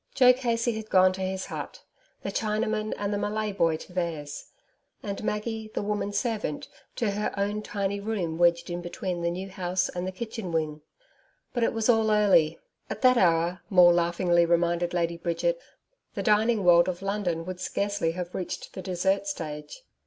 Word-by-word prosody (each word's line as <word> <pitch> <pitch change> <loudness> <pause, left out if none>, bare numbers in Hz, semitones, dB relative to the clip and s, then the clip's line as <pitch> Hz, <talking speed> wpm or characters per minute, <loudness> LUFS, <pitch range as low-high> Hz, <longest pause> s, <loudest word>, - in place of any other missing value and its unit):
Joe 250 -1 +7
Casey 240 -2 0
had 220 -1 -6
gone 185 0 +5
to 190 - -6
his 190 0 -2
hut, - - -7 0.4
the - - -3
Chinaman 215 0 -1
and 205 0 -2
the 205 - -1
Malay 215 +1 -1
boy 165 -5 +1
to 180 - -12
theirs, 160 -5 -3 0.6
and 200 0 -4
Maggie, 220 +1 -3
the - - -1
woman 205 0 -1
servant, 210 - -2 0.3
to 225 -4 0
her 210 +1 -1
own 205 +1 -1
tiny 200 -1 -2
room 195 -6 -3
wedged 170 0 +3
in 175 0 -3
between 175 0 -4
the 170 - +1
new 185 +3 -4
house 180 0 -1
and 180 +1 -4
the - - -2
kitchen 220 -2 -5
wing. 155 -2 -1 0.7
But 240 - -1
it 230 - +3
was 225 -1 0
all 225 -2 +4
early. 190 -7 +4 0.3
At - - -6
that 255 -1 +6
hour, 170 0 +2
Maule 180 -3 +7
laughingly 175 0 +2
reminded 170 0 +1
Lady 170 -1 0
Bridget, 340 - -1 0.5
the - - -2
dining 215 0 +3
world 175 0 +6
of 180 +1 -5
London 195 -5 -1
would 185 0 -6
scarcely 200 -2 -1
have 180 0 -5
reached 180 - -5
the 190 - -6
dessert 190 +7 0
stage. 160 - -6
190 Hz, 180 wpm, -27 LUFS, 175-215 Hz, 0.7 s, Joe